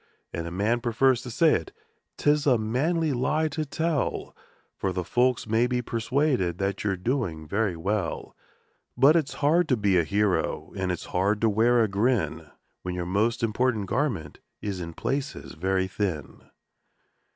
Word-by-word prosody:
And 85 0 -3
a - - -6
man 105 +6 0
prefers 120 +1 +2
to 125 - -7
say 160 +7 +3
it 80 - -2 0.5
'tis 150 0 +2
a 125 -3 +5
manly 145 +8 0
lie 155 +5 +1
to 155 +1 -3
tell, 160 0 -2 0.4
For 95 - -2
the 90 0 -2
folks 125 +6 +1
may 115 +2 +2
be 125 0 -1
persuaded 120 - 0
that 100 +1 -2
you're 100 -2 0
doing 90 - -2
very 100 +1 0
well; 95 +1 -2 0.6
But 140 +5 +6
it's 155 -4 0
hard 165 +3 +4
to 130 - +3
be 100 -3 +3
a - - +3
hero, 100 +3 0
and 95 -1 -1
it's 90 - -4
hard 100 +3 +2
to 115 - +4
wear 115 +3 +4
a - - +2
grin, 105 +4 0 0.3
When 90 -1 -4
your 90 -1 -3
most 105 +6 0
important 115 -1 +1
garment 105 - -2 0.2
is 100 -3 -4
in 85 -2 -6
places 140 +2 -3
very 95 +3 0
thin. 95 - -4
110 Hz, 165 wpm, -26 LUFS, 95-130 Hz, 0.6 s, But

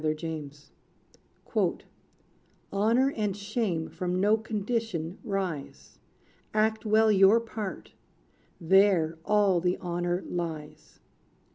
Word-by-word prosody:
=The 155 0 0
Shoemaker= 150 -3 -6 0.9
"Honor 230 +7 +3
and 210 -3 -1
shame 200 -5 -2
from 180 0 -3
no 205 +3 +4
condition 215 -5 -3
rise. 190 - -5 0.6
Act 220 +1 +1
well 220 +1 +4
your 195 +3 +6
part: 220 -4 -6 0.7
there 175 -3 +3
all 200 -4 +3
the 180 +1 +1
honor 175 0 -2
lies." 160 -4 -6
195 Hz, 95 wpm, -28 LUFS, 170-215 Hz, 0.9 s, your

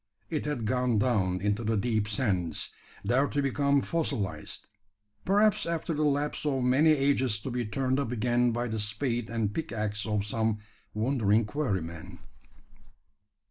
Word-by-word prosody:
It 155 -2 -2
had 140 -7 -2
gone 125 0 +1
down 100 -6 +1
into 105 +3 0
the 110 0 +1
deep 110 -1 0
sands, 100 -6 -1 0.3
there 130 +6 +3
to 145 - -2
become 140 0 +2
fossilised 140 - -2 0.6
perhaps 205 0 +3
after 165 0 -2
the 150 - -1
lapse 145 0 0
of 135 -4 0
many 130 +6 +4
ages 135 -6 +2
to 130 - -5
be 120 0 -1
turned 130 +4 0
up 130 -4 -2
again 120 +1 +2
by 120 +1 -1
the 110 -1 -3
spade 115 +2 -1
and 110 -3 -1
pick 165 0 -4
axe 110 0 -1
of 105 -2 0
some 110 0 0 0.4
wondering 110 -2 +2
quarry 105 - -1
man. 85 +2 -9
120 Hz, 155 wpm, -29 LUFS, 105-140 Hz, 0.6 s, many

